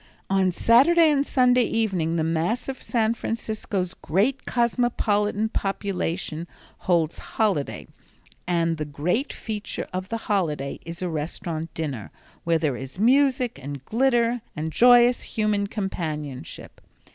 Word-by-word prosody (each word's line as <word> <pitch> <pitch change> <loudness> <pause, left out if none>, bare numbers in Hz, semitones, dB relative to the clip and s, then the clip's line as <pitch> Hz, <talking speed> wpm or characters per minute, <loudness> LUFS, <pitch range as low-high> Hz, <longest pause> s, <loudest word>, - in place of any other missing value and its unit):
On 190 -1 +3
Saturday 305 - +5
and 280 -1 +2
Sunday 250 -3 +3
evening 190 -9 0
the 160 - +1
mass 165 +9 0
of 265 -1 -5
San 230 -2 +1
Francisco's 215 -5 -3
great 215 - 0
cosmopolitan 220 -3 +1
population 185 -5 -3 0.4
holds 165 -3 +2 0.2
holiday 200 -10 0 0.6
and 165 -2 +1
the 155 - -3
great 165 - -1
feature 210 -2 -5
of 185 +1 -4
the 230 - -2
holiday 155 -9 -1
is 170 +2 -5
a - - 0
restaurant 160 +1 -4
dinner, 140 -10 -4 0.4
where 165 -1 +3
there 155 -5 0
is 135 +5 -8
music, 255 - +3
and 140 -1 -7
glitter, 240 -1 +2
and 160 0 -3
joyous, 245 +5 +6
human 210 -2 0
companionship. 155 - -5
195 Hz, 125 wpm, -24 LUFS, 165-235 Hz, 0.6 s, joyous